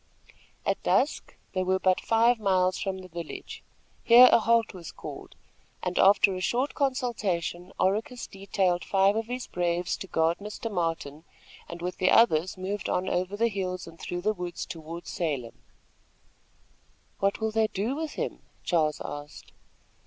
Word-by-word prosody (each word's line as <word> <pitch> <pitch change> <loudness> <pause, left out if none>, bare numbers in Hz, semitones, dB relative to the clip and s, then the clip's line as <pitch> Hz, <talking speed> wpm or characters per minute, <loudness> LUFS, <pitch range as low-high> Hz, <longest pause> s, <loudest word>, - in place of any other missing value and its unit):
At - - 0
dusk - - +1 0.2
they 185 - 0
were 185 +1 +2
but 185 -1 +2
five 230 +1 +3
miles 185 -3 +2
from 190 -1 -2
the 185 -1 -10
village. 170 -2 -8 0.4
Here 245 +2 +9
a - - +6
halt 230 0 +2
was 175 -4 -9
called, - - -9 0.5
and, 180 0 -1
after 195 0 +6
a 185 - -4
short 245 +8 0
consultation, 210 - -1
Oracus 225 +7 0
detailed 190 -2 -1
five 195 +1 +3
of 225 0 -2
his 245 +1 -4
braves 175 0 -1
to 195 - -7
guard 165 -1 +1
Mr. 210 +2 -6
Martin, 165 -4 -2 0.5
and 170 0 -7
with 180 +1 -3
the 185 - +3
others 185 -6 +4
moved 195 +2 -3
on 185 +1 0
over 185 +3 -1
the 230 +2 +3
hills 185 -4 -3
and 165 -1 -13
through 175 +2 -4
the 215 +4 +1
woods 175 -3 -5
toward 170 -1 -8
Salem. 135 - -3 1.6
"What 195 0 +1
will 220 0 -1
they 220 0 +2
do 215 +7 -2
with 315 0 -4
him?" - - -4 0.2
Charles 155 -4 +1
asked. 145 0 -8
185 Hz, 160 wpm, -27 LUFS, 175-215 Hz, 1.6 s, Here